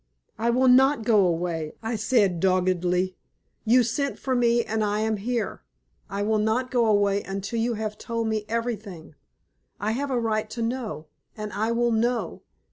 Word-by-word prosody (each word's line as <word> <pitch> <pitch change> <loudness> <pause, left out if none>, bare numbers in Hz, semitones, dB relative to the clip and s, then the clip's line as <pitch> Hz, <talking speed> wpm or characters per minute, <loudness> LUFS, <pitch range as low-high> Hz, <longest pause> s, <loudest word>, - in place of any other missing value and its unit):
"I 230 +1 +1
will 255 +2 +3
not 265 0 +5
go 210 -5 +4
away," 165 -2 -2
I 225 +1 -2
said, 210 -5 +2
doggedly. 185 0 +1 0.5
"You 245 +3 +5
sent 275 +5 -2
for 260 - -2
me, 235 -1 +3
and 220 0 -1
I 210 0 0
am 220 -1 0
here. 235 +3 -3 0.5
I 200 +1 -2
will 215 +1 +1
not 225 +4 0
go 240 -3 +2
away 205 -1 +3
until 195 +4 -4
you 235 +1 0
have 215 -1 -4
told 230 -1 -2
me 220 -1 -1
everything. 215 -8 -4 0.7
I 210 +2 -1
have 275 +5 -2
a 255 -2 0
right 215 -2 -1
to 230 +1 -4
know, 225 - -3 0.3
and 210 -1 -5
I 220 +2 0
will 240 0 +1
know! 235 +2 0
220 Hz, 175 wpm, -25 LUFS, 200-235 Hz, 0.7 s, not